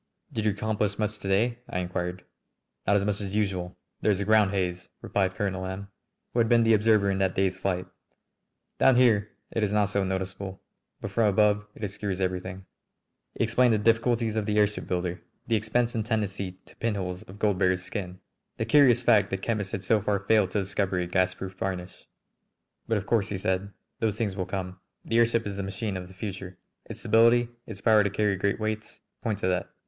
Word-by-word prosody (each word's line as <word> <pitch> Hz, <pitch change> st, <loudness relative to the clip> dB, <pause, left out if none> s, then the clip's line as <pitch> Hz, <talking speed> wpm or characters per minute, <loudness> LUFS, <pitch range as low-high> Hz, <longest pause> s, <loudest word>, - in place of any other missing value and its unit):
"Did 110 Hz, -2 st, -2 dB
you 105 Hz, -, +4 dB
accomplish 105 Hz, 0 st, -1 dB
much 105 Hz, 0 st, -1 dB
to -, -, -6 dB
day?" 115 Hz, +5 st, +1 dB
I -, -, -3 dB
inquired. 90 Hz, 0 st, -3 dB, 0.6 s
"Not 100 Hz, -, +4 dB
as 100 Hz, -1 st, +2 dB
much 105 Hz, 0 st, -1 dB
as 100 Hz, 0 st, -4 dB
usual. 95 Hz, -4 st, -1 dB, 0.2 s
There -, -, +2 dB
is 100 Hz, -2 st, +2 dB
a 100 Hz, -, -1 dB
ground 105 Hz, -1 st, +5 dB
haze," 90 Hz, -2 st, -2 dB
replied 95 Hz, -2 st, 0 dB
Colonel 95 Hz, -1 st, -2 dB
M, 95 Hz, +2 st, -5 dB, 0.4 s
who 120 Hz, -, +1 dB
had 115 Hz, -1 st, +3 dB
been 120 Hz, -1 st, +5 dB
the 115 Hz, 0 st, +4 dB
observer 105 Hz, -2 st, +4 dB
in 95 Hz, -, -1 dB
that 95 Hz, -1 st, +1 dB
day's 95 Hz, -1 st, +1 dB
flight. 90 Hz, -1 st, -1 dB, 0.9 s
"Down 135 Hz, -, +6 dB
here 110 Hz, -4 st, +4 dB, 0.2 s
it 115 Hz, -, -1 dB
is 105 Hz, -, +1 dB
not 105 Hz, -1 st, +2 dB
so 100 Hz, -1 st, +1 dB
noticeable, 95 Hz, 0 st, -4 dB, 0.4 s
but 100 Hz, -, -5 dB
from 110 Hz, +2 st, +3 dB
above 105 Hz, +1 st, +3 dB
it -, -, -10 dB
obscures 100 Hz, -1 st, -3 dB
everything." 95 Hz, 0 st, -3 dB, 0.7 s
He -, -, 0 dB
explained 115 Hz, +1 st, +3 dB
the -, -, +2 dB
difficulties 115 Hz, +1 st, +2 dB
of 110 Hz, -1 st, -1 dB
the 105 Hz, 0 st, +1 dB
airship 105 Hz, 0 st, +1 dB
builder, 90 Hz, -1 st, -2 dB, 0.2 s
the 115 Hz, -, +1 dB
expense 115 Hz, +3 st, 0 dB
and 110 Hz, -, -1 dB
tendency 100 Hz, -4 st, -2 dB
to -, -, -16 dB
"pinholes" 95 Hz, -5 st, -2 dB
of 95 Hz, -, -10 dB
gold 105 Hz, -2 st, +1 dB
beaters' 90 Hz, -1 st, +2 dB
skin, 90 Hz, -3 st, -5 dB, 0.4 s
the -, -, -1 dB
curious 130 Hz, -5 st, +5 dB
fact 110 Hz, -4 st, +4 dB
that 95 Hz, 0 st, -4 dB
chemists 105 Hz, -4 st, -1 dB
had 95 Hz, -, -4 dB
so 105 Hz, +2 st, +3 dB
far 100 Hz, 0 st, +1 dB
failed 100 Hz, 0 st, +2 dB
to 100 Hz, +2 st, 0 dB
discover 95 Hz, -1 st, -1 dB
a 90 Hz, -, 0 dB
gasproof 95 Hz, +1 st, -1 dB
varnish. 95 Hz, -1 st, -5 dB, 0.8 s
"But 115 Hz, -, +1 dB
of 100 Hz, -, -4 dB
course," 110 Hz, -3 st, +1 dB
he 100 Hz, -, -2 dB
said, 95 Hz, +1 st, -1 dB, 0.3 s
"those 110 Hz, -3 st, 0 dB
things 105 Hz, -4 st, -1 dB
will 95 Hz, -2 st, -3 dB
come. 95 Hz, -1 st, -4 dB, 0.3 s
The 115 Hz, -, +2 dB
airship 115 Hz, 0 st, +3 dB
is 100 Hz, -1 st, -4 dB
the -, -, -2 dB
machine 95 Hz, +2 st, -3 dB
of 90 Hz, -1 st, -5 dB
the 95 Hz, -, -15 dB
future. 95 Hz, -2 st, -6 dB, 0.3 s
Its -, -, -7 dB
stability, 115 Hz, +2 st, +4 dB, 0.2 s
its 100 Hz, -3 st, -8 dB
power 110 Hz, -1 st, +5 dB
to 100 Hz, -, +1 dB
carry 105 Hz, 0 st, +1 dB
great 100 Hz, +3 st, 0 dB
weights, 110 Hz, 0 st, -4 dB, 0.2 s
point 110 Hz, -3 st, -1 dB
to 90 Hz, -, -1 dB
that. 90 Hz, +1 st, 0 dB
100 Hz, 205 wpm, -27 LUFS, 95-110 Hz, 0.9 s, Down